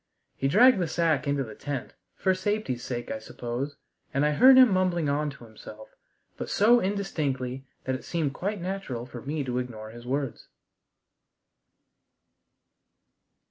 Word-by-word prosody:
He 135 - 0
dragged 235 - +6
the 175 - 0
sack 160 -3 +1
into 140 -1 +1
the 110 -3 -9
tent, 140 +2 -5 0.2
for 190 - +2
safety's 185 - -2
sake, 120 -1 -4
I 110 - -3
suppose, 120 +5 -5 0.4
and 140 +2 +1
I 150 - +3
heard 260 - +7
him 255 -4 +8
mumbling 180 -4 +1
on 150 +1 0
to 140 -4 -11
himself, 110 -1 -12 0.5
but - - -5
so 235 +4 +5
indistinctly 140 -10 -2 0.2
that 130 - -1
it 130 - -4
seemed 155 -5 -1
quite 200 +6 -3
natural 175 -10 -4
for 125 -2 -9
me 145 +3 -3
to 125 -1 -2
ignore 110 -3 -6
his 120 +1 -11
words. 135 -1 -3
145 Hz, 150 wpm, -27 LUFS, 125-185 Hz, 0.5 s, him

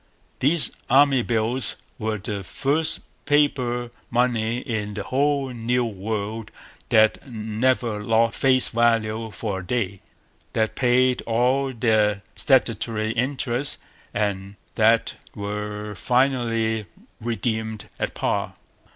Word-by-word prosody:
These 150 +4 +2 0.2
Army 135 -2 +5
Bills 115 +1 -1 0.2
were 110 0 -1
the 100 0 -5
first 145 - 0 0.2
paper 130 -5 +1 0.2
money 120 -1 +1
in 110 -5 -3
the 100 - -3
whole 140 +2 +1
New 120 +1 0
World 105 +1 -4 0.4
that 110 +4 +3
never 110 0 0
lost 115 +1 +2
face 130 -1 +4
value 115 -1 +1
for 100 -1 -3
a - - -7
day, 100 -2 -2 0.5
that 110 -1 +1
paid 125 0 +3
all 125 +4 +2
their 110 -4 +2
statutory 115 -5 +1
interest, 130 +2 -1 0.3
and 100 -1 -2 0.2
that - - +3 0.2
were 105 +1 -4
finally 115 -4 +1 0.3
redeemed 110 -2 -2
at - - -2
par. - - -1
115 Hz, 110 wpm, -24 LUFS, 110-125 Hz, 0.5 s, Army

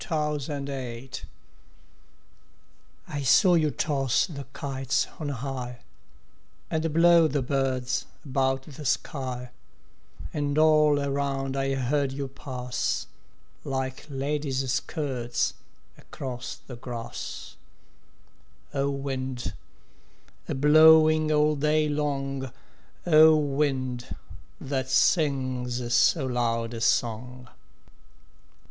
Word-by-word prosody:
XXVThe 150 -3 -2
Wind 130 -2 -6 1.9
I 145 - -4
saw 175 +8 +5
you 155 -3 +3
toss 135 -4 +1
the 140 -6 -8
kites 135 -2 -1
on 150 -2 -3
high 125 -2 -5 0.9
And 160 0 0
blow 170 +1 +6
the 140 -2 -1
birds 130 -1 -1 0.2
about 135 -1 0
the 150 +1 -10
sky; 125 -2 -2 0.8
And 145 -1 -1
all 155 -2 +5
around 140 -1 -2
I 135 0 0
heard 135 +1 0
you 140 0 -4
pass, 125 -2 -3 0.6
Like 130 -1 -4
ladies' 135 -2 -1
skirts 130 -5 -2 0.4
across 125 -2 -7
the 125 - -11
grass 120 -2 -7 1.2
O 140 0 0
wind, 130 -3 -4 1.0
a - - -1
blowing 155 +2 +6
all 150 0 +3
day 150 +1 +2
long, 135 -3 -2 0.5
O 160 -2 +7
wind, 135 -4 -1 0.4
that 130 -1 -3
sings 130 -5 +1
so 135 +3 +4
loud 115 -2 -1
a 115 - -6
song! 125 +2 -1
135 Hz, 95 wpm, -26 LUFS, 130-150 Hz, 1.9 s, O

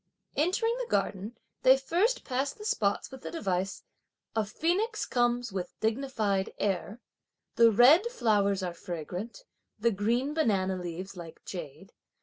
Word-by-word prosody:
Entering 420 +9 +1
the - - -4
garden, 205 +4 -1 0.2
they 260 +1 +7
first 360 - +1
passed 270 +5 -2
the 425 - -9
spots 205 - 0
with 265 -1 -10
the - - -6
device 195 - -2 0.5
"a 220 - +2
phoenix 360 - -1
comes 240 -2 0
with 185 -2 -5
dignified 220 -4 0
air," 200 +3 -2 0.6
"the 230 0 +7
red 260 - +6
(flowers 205 - +1
are) 175 -1 -2
fragrant 180 - -6 0.3
and 210 - -23
the 235 - +6
green 235 +8 0
(banana 195 -11 +1
leaves 180 +2 -6
like) 170 -2 -10
jade!" 170 0 -8
220 Hz, 140 wpm, -29 LUFS, 190-275 Hz, 0.6 s, they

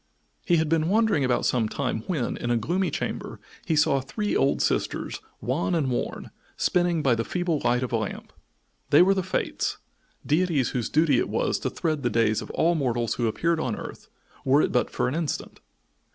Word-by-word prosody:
He 175 - +3
had 160 0 +1
been 160 +1 +1
wandering 215 -7 +3
about 125 -2 +1
some 115 -4 +1
time 125 -4 -2
when, 150 -10 -1
in 120 - -4
a 120 - +2
gloomy 175 - 0
chamber, - - -4 0.3
he 165 - +2
saw 140 -2 +3
three 205 - -3
old 140 - +2
sisters, - - -1 0.2
wan 155 +8 0
and 140 -6 0
worn, 120 - -3 0.3
spinning 175 -3 +1
by 130 - +4
the 115 0 0
feeble 175 +1 -1
light 125 +1 +2
of 125 - -3
a - - +3
lamp. 110 -3 -5 0.6
They 150 - +7
were 195 +2 +4
the 190 - 0
Fates, 185 +1 -2 0.5
deities 155 -4 +2
whose 120 -3 -2
duty 150 -5 +3
it - - -1
was - - 0
to - - -2
thread 155 -3 -2
the 120 - +1
days 110 -1 +2
of - - -9
all 170 +2 +2
mortals 120 -7 0
who 120 - 0
appeared 165 +9 0
on 125 -8 -1
earth, - - -9 0.3
were 140 +3 +4
it - - 0
but 125 - +1
for - - -1
an 125 - -2
instant. 160 -1 -3
145 Hz, 200 wpm, -26 LUFS, 125-170 Hz, 0.6 s, They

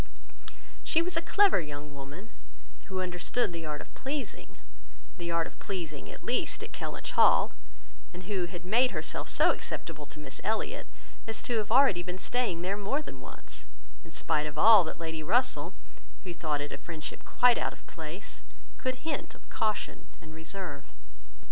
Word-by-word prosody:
She 320 - +4
was 360 0 -2
a 330 - +2
clever 395 - +5
young 145 -1 -7
woman, 145 +11 -9 0.5
who 190 -2 -2
understood 180 +4 0
the 165 -2 -4
art 150 -1 -3
of - - -13
pleasing—the 265 -9 -7
art 170 -1 +2
of - - -10
pleasing, 160 - -4
at - - -11
least, - - +1
at - - -7
Kellynch - - -4
Hall; - - +6 0.6
and 180 +1 -8
who 185 -1 0
had 175 +1 -7
made 240 +7 +5
herself - - -2
so - - +5
acceptable 155 -3 -5
to 150 - -9
Miss 130 -3 -6
Elliot, 220 0 -1 0.4
as 225 - -3
to 235 -2 +1
have 210 - -1
been 230 - +5
already 180 -9 +4
staying 190 -5 0
there 195 +2 0
more 240 +9 0
than 130 - -9
once, - - -10 0.4
in - - -12
spite 150 0 0
of 150 - -7
all 220 -4 +9
that 160 - -4
Lady 160 -2 -3
Russell, 245 +11 +2 0.5
who 180 -3 -5
thought 150 -4 -1
it 145 - -4
a - - -5
friendship 160 -3 -6
quite 245 0 +5
out - - 0
of - - -14
place, 165 +6 -7 0.4
could 255 +2 -2
hint 320 - -2
of - - -19
caution 215 -1 -1
and 155 0 -12
reserve. 160 -2 -6
180 Hz, 175 wpm, -31 LUFS, 155-225 Hz, 0.6 s, all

